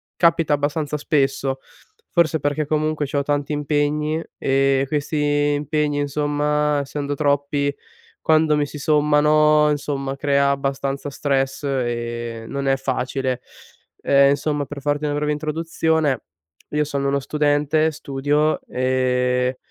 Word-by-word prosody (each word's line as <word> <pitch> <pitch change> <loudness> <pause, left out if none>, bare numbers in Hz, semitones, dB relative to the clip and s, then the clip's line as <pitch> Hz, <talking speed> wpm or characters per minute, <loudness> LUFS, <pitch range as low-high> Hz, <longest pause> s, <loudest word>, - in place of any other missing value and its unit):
capita 165 -3 +3
abbastanza 145 +1 -1
spesso. 135 -2 0 0.5
Forse 160 -2 +2
perché 145 +1 -1
comunque 155 -1 0
c'ho 140 +1 -1
tanti 145 0 -1
impegni, 150 +2 0
e 135 0 +2
questi 150 +1 -2 0.4
impegni, 150 0 -1
insomma, 145 0 0
essendo 145 0 -4
troppi 140 0 0 0.5
quando 155 -1 +3
mi 145 -1 0
si 150 - -9
sommano, 150 0 +4
insomma 140 -2 -2
crea 140 0 +2
abbastanza 140 0 -2
stress 135 -1 -1
e 120 -3 -3
non 140 +1 -3
è 135 - +3
facile. 130 -1 -2 0.6
Ehm, 140 0 +5
insomma 145 0 -1
per 140 0 -8
farti 145 +1 -1
una 145 -1 -1
breve 150 0 0
introduzione: 155 -2 0 0.5
io 150 0 +2
sono 140 -1 -2
uno 140 0 +1
studente, 150 +2 +1
studio 145 +1 0
e 125 0 0
145 Hz, 120 wpm, -21 LUFS, 135-150 Hz, 0.6 s, Ehm